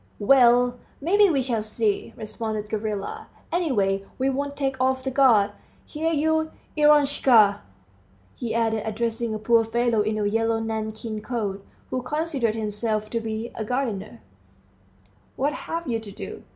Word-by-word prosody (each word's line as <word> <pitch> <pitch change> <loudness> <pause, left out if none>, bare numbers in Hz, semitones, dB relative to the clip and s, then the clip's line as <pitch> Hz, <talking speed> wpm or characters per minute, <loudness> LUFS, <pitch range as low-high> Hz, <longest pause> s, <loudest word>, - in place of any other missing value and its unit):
"Well, 245 +1 +4 0.2
may 335 +8 +1
be, 410 -1 +6
we 275 -5 +1
shall 235 -4 -1
see," 215 -1 -1
responded 215 -1 -4
Gavrila; 210 -2 -4 0.2
"any 345 -3 0
way, 195 -4 +1
we 270 +1 +1
won't 280 +1 -3
take 270 -2 -2
off 260 0 +1
the 265 - -2
guard. 245 -7 +4 0.3
Here 320 +2 -2
you, 315 +1 +1 0.3
Eroshka!" 275 -9 +5 0.7
he 235 -3 -4
added, 225 -1 +1
addressing 225 +1 -2
a - - -2
poor 230 +1 +3
fellow 235 0 +1
in 215 +1 -1
a 210 - 0
yellow 225 +2 +1
nankeen 220 0 -4
coat, 210 -4 -3 0.3
who 255 - -1
considered 275 -4 -1
himself 215 0 -2
to 230 - 0
be 225 +1 -4
a 220 - -4
gardener, 215 - -3 1.1
"what 285 +3 0
have 335 +1 -5
you 230 -2 0
to 215 -2 -10
do? - - -8
230 Hz, 150 wpm, -24 LUFS, 215-270 Hz, 1.1 s, be